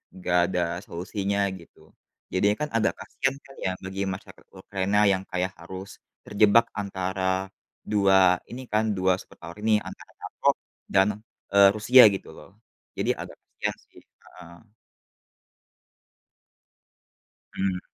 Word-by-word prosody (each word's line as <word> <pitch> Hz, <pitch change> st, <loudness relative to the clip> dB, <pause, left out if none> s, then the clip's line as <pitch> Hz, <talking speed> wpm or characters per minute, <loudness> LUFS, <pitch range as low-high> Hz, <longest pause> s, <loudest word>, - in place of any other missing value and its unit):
enggak 90 Hz, -1 st, +1 dB
ada 90 Hz, -2 st, 0 dB, 0.2 s
solusinya, 100 Hz, +3 st, -3 dB, 0.2 s
gitu. 85 Hz, -, -19 dB, 0.4 s
Jadinya 100 Hz, +3 st, +2 dB
kan 150 Hz, -, -3 dB
agak 115 Hz, -1 st, +1 dB
kasihan 135 Hz, 0 st, -2 dB
kan 135 Hz, -, -16 dB
ya 95 Hz, -, +1 dB
bagi 95 Hz, +1 st, -5 dB
masyarakat 95 Hz, 0 st, -8 dB
Ukraina 100 Hz, +1 st, -1 dB
yang 95 Hz, 0 st, 0 dB
kayak 90 Hz, +1 st, -2 dB
harus 95 Hz, +1 st, -9 dB, 0.2 s
terjebak 105 Hz, +3 st, +4 dB
antara 95 Hz, -1 st, -2 dB, 0.3 s
2 95 Hz, -3 st, +4 dB
ini 125 Hz, +2 st, -8 dB
kan, 110 Hz, +1 st, +2 dB
2 95 Hz, 0 st, +1 dB
superpower 85 Hz, +1 st, -12 dB
ini, 110 Hz, 0 st, +3 dB
antara -, -, -11 dB
NATO -, -, -5 dB, 0.4 s
dan, 95 Hz, +1 st, +3 dB, 0.4 s
eee, 100 Hz, 0 st, +7 dB
Rusia 125 Hz, +4 st, +7 dB
gitu -, -, -8 dB
loh, -, -, -14 dB, 0.5 s
jadi -, -, +1 dB
agak -, -, -8 dB
kasihan -, -, -4 dB, 0.2 s
sih. -, -, -16 dB, 0.2 s
Heeh. 85 Hz, +3 st, -15 dB, 2.9 s
Hmm. 95 Hz, -2 st, -1 dB
95 Hz, 125 wpm, -26 LUFS, 95-105 Hz, 2.9 s, eee